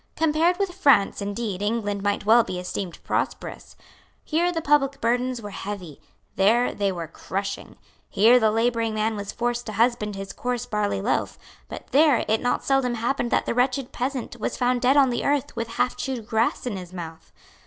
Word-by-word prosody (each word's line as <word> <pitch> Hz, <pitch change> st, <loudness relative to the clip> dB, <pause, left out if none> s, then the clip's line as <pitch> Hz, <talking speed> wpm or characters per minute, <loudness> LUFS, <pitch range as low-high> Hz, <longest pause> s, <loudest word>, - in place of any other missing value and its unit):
Compared 325 Hz, +3 st, +2 dB
with 395 Hz, -3 st, -1 dB
France 280 Hz, -, +3 dB
indeed 200 Hz, -1 st, -3 dB
England 205 Hz, -1 st, -1 dB
might 205 Hz, 0 st, -1 dB
well 230 Hz, +2 st, +6 dB
be 185 Hz, -, -5 dB
esteemed 180 Hz, 0 st, -5 dB
prosperous. -, -, -3 dB, 0.5 s
Here 340 Hz, +3 st, +1 dB
the 335 Hz, -, -2 dB
public 290 Hz, -3 st, +2 dB
burdens 245 Hz, +1 st, 0 dB
were 205 Hz, -, -6 dB
heavy; 190 Hz, -7 st, -7 dB, 0.4 s
there 225 Hz, +6 st, +3 dB
they 200 Hz, -1 st, 0 dB
were 170 Hz, -3 st, -4 dB
crushing. 195 Hz, +4 st, -5 dB, 0.3 s
Here 230 Hz, +5 st, +5 dB
the 220 Hz, -2 st, +3 dB
labouring 225 Hz, 0 st, 0 dB
man 215 Hz, +1 st, 0 dB
was 205 Hz, -1 st, -5 dB
forced 240 Hz, 0 st, -2 dB
to 215 Hz, -, -5 dB
husband 220 Hz, -2 st, +1 dB
his 195 Hz, 0 st, -6 dB
coarse 245 Hz, -1 st, -3 dB
barley 210 Hz, -4 st, -1 dB
loaf; 235 Hz, -, -1 dB, 0.3 s
but -, -, -8 dB
there 290 Hz, -3 st, +4 dB
it 220 Hz, +1 st, +1 dB
not 245 Hz, -, 0 dB
seldom 270 Hz, -3 st, +1 dB
happened 240 Hz, +2 st, -1 dB
that -, -, +1 dB
the -, -, -1 dB
wretched 250 Hz, +1 st, 0 dB
peasant 255 Hz, -1 st, -4 dB
was -, -, -3 dB
found 245 Hz, 0 st, +1 dB
dead 260 Hz, +3 st, +4 dB
on 270 Hz, -3 st, +5 dB
the 240 Hz, -, -2 dB
earth 285 Hz, -2 st, 0 dB
with 230 Hz, -1 st, -3 dB
halfchewed 250 Hz, 0 st, -2 dB
grass 225 Hz, +3 st, 0 dB
in 225 Hz, -6 st, -3 dB
his 180 Hz, -1 st, -9 dB
mouth. 165 Hz, -2 st, -8 dB
230 Hz, 185 wpm, -24 LUFS, 205-255 Hz, 0.5 s, well